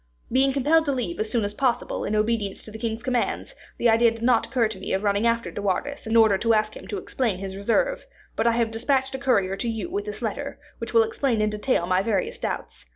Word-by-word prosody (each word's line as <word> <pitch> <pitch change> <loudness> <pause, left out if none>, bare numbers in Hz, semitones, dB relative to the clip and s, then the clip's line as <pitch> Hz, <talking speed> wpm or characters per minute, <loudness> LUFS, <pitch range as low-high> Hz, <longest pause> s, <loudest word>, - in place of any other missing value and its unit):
Being 265 +2 +4
compelled 300 +4 +3
to 285 - +1
leave 240 -11 -3
as 215 0 -1
soon 225 -3 +1
as 205 - -3
possible, 250 +2 -1
in 215 - -1
obedience 215 -2 0
to 215 - -11
the 220 - -8
king's 225 0 -3
commands, 250 - -1 0.2
the 240 - +2
idea 230 +1 +5
did 230 0 -7
not 240 -1 +3
occur 245 -4 +2
to 215 - -8
me - - -4
of 190 +2 0
running 205 +2 +2
after 230 0 0
De - - -5
Wardes 225 +8 -2
in 225 - 0
order 220 -4 +5
to 230 0 +3
ask 215 0 0
him - - -10
to 205 - -4
explain 220 +1 -1
his 190 0 -6
reserve; 240 - 0 0.3
but - - +1
I 235 - +4
have 230 -1 +1
dispatched 265 +4 0
a 265 - -4
courier 200 -8 +2
to 235 - -2
you 225 +9 -4
with 405 +2 -2
this 425 - -6
letter, - - -3 0.2
which - - -5
will 460 - +6
explain 280 - 0
in 215 0 +1
detail 210 -3 0
my 185 +1 +2
various 200 -2 -1
doubts. - - -5
230 Hz, 250 wpm, -25 LUFS, 210-260 Hz, 0.3 s, will